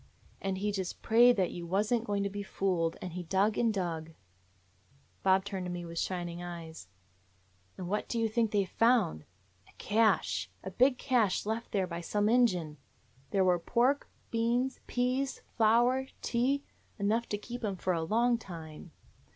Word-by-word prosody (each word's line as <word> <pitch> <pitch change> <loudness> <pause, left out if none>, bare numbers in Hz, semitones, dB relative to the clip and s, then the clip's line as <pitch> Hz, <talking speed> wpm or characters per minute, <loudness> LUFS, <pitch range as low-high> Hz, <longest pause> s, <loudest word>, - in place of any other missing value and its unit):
And 195 -1 -2
he 205 +2 -1
just 190 -3 -4
prayed 240 +2 +6
that 185 -2 +1
you 170 -1 -6
was 205 +6 +1
n't 235 -1 +1
going 205 -2 0
to 200 - -1
be 205 +1 -4
fooled, 180 -4 -1
and 180 -2 -5
he 180 - -4
dug 195 +5 +1
and 230 -2 +2
dug 165 -5 -3 0.4
— 95 0 -37
" 135 0 -34
Bob 190 0 +4
turned 190 -3 -4
to - - -4
me 175 -1 -5
with 170 0 -5
shining 175 -2 -3
eyes. 165 - -8 0.9
"And 180 - -5
what 210 +3 -2
do 235 - -2
you 225 -1 +2
think 225 0 +1
they 205 -2 +1
found? 225 - +2 0.4
A - - -21
cache! 215 -3 +1
A 190 - -5
big 250 +6 +3
cache 235 -10 +1
left 225 +2 -3
there 195 -3 +1
by 170 -1 -5
some 205 +4 0
Injun. 180 -11 +2 0.5
There 195 -2 +2
were 180 -1 +3
pork, 245 +10 +1 0.2
beans, 240 +3 0
peas, 255 +2 -1
flour, 240 +4 +3 0.2
tea 265 +4 +1 0.2
— - - -36
enough 220 +3 0
to 205 - -1
keep 240 +3 -8
'em 200 -3 -1
for 185 0 -1
a 165 - -1
long 235 +7 +2
time. 165 -5 -9
200 Hz, 185 wpm, -31 LUFS, 175-235 Hz, 0.9 s, prayed